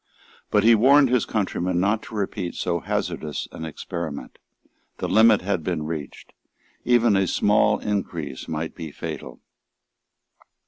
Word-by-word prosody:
But 105 - +3
he 115 +1 +7
warned 135 +5 +5
his 125 -2 +1
countrymen 90 -4 -1
not 105 +4 +1
to - - -10
repeat 100 -3 -3
so 85 -1 -1
hazardous 75 -2 -3
an 80 - -7
experiment. 80 -1 -6 0.6
The - - -3
limit 110 0 +5
had 95 -4 -1
been 80 -2 -2
reached. 75 -3 -7 0.5
Even 120 -3 +4
a 95 -1 +2
small 105 +4 +3
increase 85 -9 -4
might 80 0 -4
be 80 -3 -7
fatal. - - -7
95 Hz, 135 wpm, -24 LUFS, 80-110 Hz, 0.6 s, he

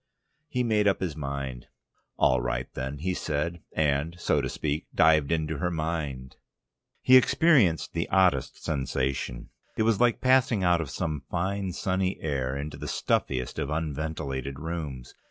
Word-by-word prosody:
He 125 -3 -1
made 105 -3 +2
up 100 - +2
his 90 -6 -3
mind. 70 -4 -5 0.5
"All - - +3
right - - -2
then," 65 +2 -4
he 90 +5 -1
said, 85 +1 -2
and, 80 +3 0
so - - +2
to - - -2
speak, 75 0 -3
dived 80 -3 +4
into 80 -2 -1
her 90 - 0
mind. 80 -6 -3 0.7
He 130 - +7
experienced 130 - +3
the 85 0 -2
oddest 90 -9 +2
sensation. 65 -4 -2 0.3
It - - +2
was 115 -1 +2
like 120 -1 +3
passing 130 -5 +3
out 90 -2 +3
of 75 - -5
some 75 0 -3
fine, 95 +2 -1
sunny 95 +1 -1
air 70 -3 -2
into 75 +2 -5
the - - -6
stuffiest 65 -1 -1
of 70 - -2
unventilated 75 -3 -3
rooms. 75 -6 -5
80 Hz, 155 wpm, -27 LUFS, 70-90 Hz, 0.7 s, He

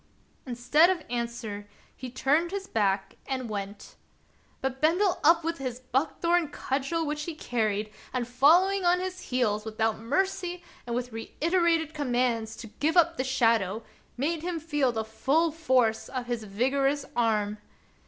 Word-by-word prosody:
Instead 255 +8 +4
of 360 -4 0
answer, 235 -4 -4 0.3
he 255 - -7
turned 290 +7 +1
his 390 +1 -4
back 195 - 0
and 260 -2 -2
went. 200 -1 -6 0.6
But 265 0 -3
Bendel 355 +5 +3
up 330 +2 +5
with 330 -1 -2
his 255 -2 -4
buck 255 +4 -2
thorn 345 -1 +3
cudgel 285 +3 -2
which 300 0 -3
he 335 - -5
carried, 215 -6 -1 0.2
and, 250 -2 -2
following 345 +10 +4
on 355 0 +4
his 370 0 -4
heels, 220 -5 +1
without 220 0 -1
mercy 355 +7 -1 0.2
and 235 - -2
with 245 0 -3
reiterated 330 +7 0
com 285 -5 -2
mands 230 -3 0
to - - -8
give 320 +4 +1
up 335 -1 +4
the 260 - 0
shadow, 230 -5 +1 0.3
made 310 +5 -1
him 345 0 -3
feel 295 -5 +1
the 220 -1 -3
full 290 +9 +1
force 255 -8 +1
of 255 -2 -4
his 240 -3 -3
vigorous 270 +7 0
arm. 215 -3 +1
265 Hz, 155 wpm, -28 LUFS, 230-330 Hz, 0.6 s, up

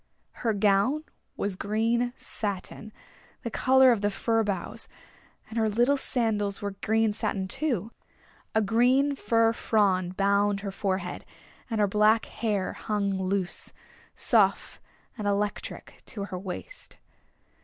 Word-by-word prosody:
Her 225 -2 +1
gown 205 +9 +2 0.3
was 200 -1 -2
green 225 +5 0
satin, 205 +1 -4 0.5
the - - -4
color 260 -1 +5
of 225 -4 +1
the 205 - +2
fir 225 +3 0
boughs, 200 -4 -4 0.6
and 230 - -3
her 220 -1 +2
little 240 +6 +3
sandals 220 -7 0
were 205 -2 -3
green 220 +2 +1
satin, 190 -2 -2
too. 235 - -2 0.6
A 220 - +4
green 255 +7 +3
fir 230 -3 +2
frond 185 -6 +1
bound 200 0 +2
her 200 -1 -4
forehead; 190 -2 -3 0.5
and 225 -2 -1
her 210 - +5
black 215 +3 +3
hair 210 -4 -2
hung 205 -2 -1
loose, 190 -1 -2 0.4
soft - - +2 0.4
and 205 - -2
electric 205 +1 -3
to 205 - -5
her 185 -2 -6
waist. 195 - -6
210 Hz, 130 wpm, -27 LUFS, 200-230 Hz, 0.6 s, color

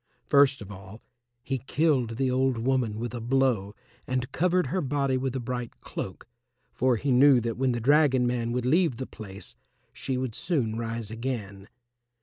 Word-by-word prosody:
First 140 -4 +4
of 100 - -11
all 95 +3 -11 0.4
he 135 -1 -2
killed 130 -4 +1
the 130 -1 +1
old 130 -1 +1
woman 120 -2 0
with 120 +1 -4
a 120 - -4
blow 120 -5 +1 0.3
and 130 +1 -2
covered 180 +1 +2
her 185 - -1
body 140 -1 0
with 130 0 -2
a - - -1
bright 120 0 -5
cloak, 95 +3 -7 0.5
for 130 -1 +2
he 140 +4 -1
knew 130 +1 +6
that 115 -1 -2
when 130 +1 +1
the 120 - -1
dragon 135 0 +4
man 120 -1 -1
would 125 0 -1
leave 160 -2 +2
the 130 - -4
place 100 -5 -10 0.4
she 130 - -3
would 130 -3 -3
soon 120 -7 -1
rise 115 -1 -4
again. 110 -5 -5
125 Hz, 175 wpm, -27 LUFS, 115-135 Hz, 0.5 s, knew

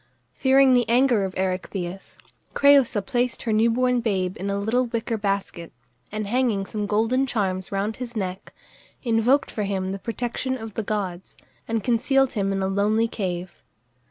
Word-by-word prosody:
Fearing 265 - +4
the 245 -2 +2
anger 240 -4 +3
of 185 - -6
Erechtheus, 185 0 -4 0.4
Crëusa 275 -7 +4
placed 245 -2 -1
her 225 - 0
new 220 +2 +4
born 250 +1 +2
babe 190 -5 -1
in 195 +3 -4
a 200 - -1
little 235 +5 +1
wicker 230 0 -2
basket, 195 -5 -3 0.4
and 215 0 -3
hanging 225 -3 0
some 210 0 -4
golden 230 +6 +1
charms 190 -6 -2
round 200 +2 -2
his 245 -1 -7
neck, 190 -3 -4 0.5
invoked 240 +3 +2
for 215 - -3
him 190 -2 -2
the 195 - -4
protection 245 +4 -3
of 225 -3 -8
the 225 - -2
gods, 195 -4 -4 0.3
and 225 -2 -1
concealed 270 +3 +2
him 195 -3 0
in 195 0 -1
a - - +1
lonely 210 +4 +1
cave. 180 -5 -5
215 Hz, 165 wpm, -24 LUFS, 195-245 Hz, 0.5 s, Fearing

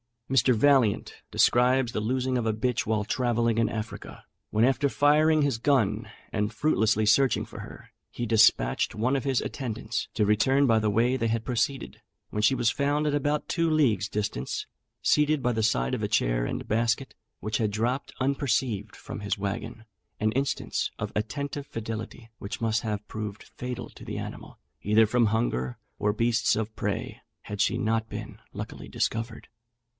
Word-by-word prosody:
Mr. 125 -1 +4
Vaillant 130 -3 +2
describes 125 0 +3
the - - -2
losing 130 +3 0
of 120 - -1
a 110 - +1
bitch 125 +2 -1
while 110 -1 0
travelling 115 0 +1
in 115 - +3
Africa, 110 -1 -6 0.3
when 110 +1 +2
after 135 +3 +3
firing 155 +3 +4
his 140 -5 +1
gun, 110 -5 +1 0.2
and 105 -1 -1
fruitlessly 110 -8 +2
searching 125 +3 +3
for - - -11
her, - - -11 0.2
he 120 - -4
despatched 110 - +3
one 125 +5 +1
of 135 - -2
his 135 -3 +1
attendants, 115 -4 -4
to 105 - +2
return 130 +7 +3
by 115 -3 +4
the 110 -1 +1
way 120 +5 +2
they 115 -2 0
had 115 0 -1
proceeded; 125 +2 -2 0.3
when 105 - -1
she 125 +5 +4
was 120 -2 +2
found 145 +2 0
at 150 - +1
about 145 +1 0
two 165 -2 +1
leagues' 120 - +2
distance, 105 - -3 0.4
seated 150 -1 +3
by 125 - +2
the 110 -1 -1
side 65 - +1
of - - -1
a - - 0
chair - - +1
and - - -4
basket, 115 +4 0 0.3
which 110 0 -1
had 110 -2 +1
dropped 120 +6 -2
unperceived 130 -6 0
from - - -8
his 100 0 -2
waggon: 105 +3 -4 0.4
an 110 0 +1
instance 135 +4 -1
of 105 0 -4
attentive 140 +6 -3
fidelity, 115 +1 -6
which 100 - -6
must 115 0 +1
have 105 -2 -4
proved 110 -1 -5
fatal 125 -2 -6
to - - -13
the - - -5
animal, - - -7 0.2
either 105 +2 +4
from 115 +1 +2
hunger 65 - -1 0.2
or 105 0 +1
beasts 115 +2 +2
of 110 0 -3
prey, - - -3 0.2
had 105 -1 -6
she - - +2
not 110 0 0
been - - -7
luckily - - -7
discovered. 115 0 -3
115 Hz, 175 wpm, -27 LUFS, 110-130 Hz, 0.4 s, Mr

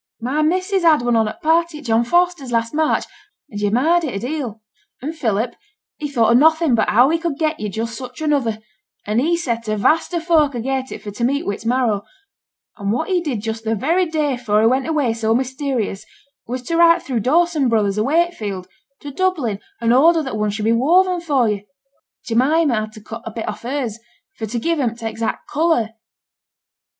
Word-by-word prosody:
'My 260 +6 -1
missus 370 +5 +1
had 315 -6 +4
one 240 -1 +2
on 220 -1 +3
at 215 - -7
th' - - -33
party 330 0 +2
at 300 - -11
John 225 0 +2
Foster's 345 -1 +1
last 230 0 0
March, 310 0 +1 0.5
and 205 -1 -5
yo' 205 - +2
admired 310 +11 +2
it 280 -8 -3
a - - -2
deal. 245 -3 -4 0.4
And 305 +5 -5
Philip, 230 -4 -1 0.5
he 295 - -3
thought 235 -5 +2
o' - - +5
nothing 315 +2 +4
but 220 -2 +2
how 240 +6 +5
he 330 +1 +1
could 330 -4 -3
get 310 0 -1
yo' 210 - -3
just 230 +3 -4
such 250 -1 -9
another, 280 -8 0 0.5
and 215 +3 +1
he 340 +4 +2
set 235 -8 -3
a 215 0 -1
vast 315 - +2
o' - - +1
folk 315 -5 +2
agait 265 +2 -2
for 210 0 -8
to 220 +4 -5
meet 280 +4 0
wi' 200 - -1
its 220 - -7
marrow; 235 -5 +1 0.7
and 200 -2 -2
what 240 - -1
he 365 -2 +2
did 270 -10 -3
just 225 0 -4
the 225 0 0
very 335 - +1
day 305 -3 0
afore 220 -4 +1
he - - +3
went 260 +4 +1
away 295 -8 +1
so 225 0 0
mysterious 260 -5 -2 0.4
was 250 +1 -4
to 330 +7 -1
write 335 0 +5
through 250 -4 -2
Dawson 300 - +2
Brothers, 210 -3 +1
o' - - +2
Wakefield, 235 - -1 0.3
to 290 - -7
Dublin, 285 - -1 0.2
and 235 0 +2
order 320 +5 +5
that 265 -5 -4
one 210 0 0
should 210 +1 -3
be 225 - +3
woven 350 +9 +3
for 280 -8 +1
yo'. 210 -2 -1 0.6
Jemima 275 +5 +2
had 215 -1 -2
to 215 - -12
cut 225 +2 -8
a - - -5
bit 225 0 -6
off 210 0 -5
hers 240 -3 -3 0.4
for 220 - -5
to 235 +3 -3
give 330 +7 0
him 240 -4 0
t' 230 - -9
exact 225 0 -3
colour.' 300 -7 +1
255 Hz, 215 wpm, -20 LUFS, 225-315 Hz, 0.7 s, o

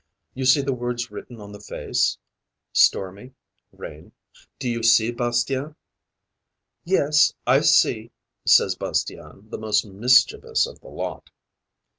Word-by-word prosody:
You 130 0 -4
see 130 +3 +5
the 135 0 -2
words 120 -2 -4
written 115 +3 -10
on 100 -1 -11
the 105 - -11
face - - -2 0.6
stormy, 100 +7 +1 0.4
rain 75 +1 -12 0.4
do - - -5
you 120 -1 -2
see, 115 0 +4
Bastien?' 120 +4 -2 1.1
'Yes, 150 -5 +2
I 130 +3 +4
see,' 120 -7 +2 0.3
says - - +4
Bastien, 95 +8 -5
the - - -6
most 110 -1 0
mischievous 125 - +2
of 485 - -12
the - - -17
lot. - - -7
120 Hz, 125 wpm, -22 LUFS, 110-140 Hz, 1.1 s, see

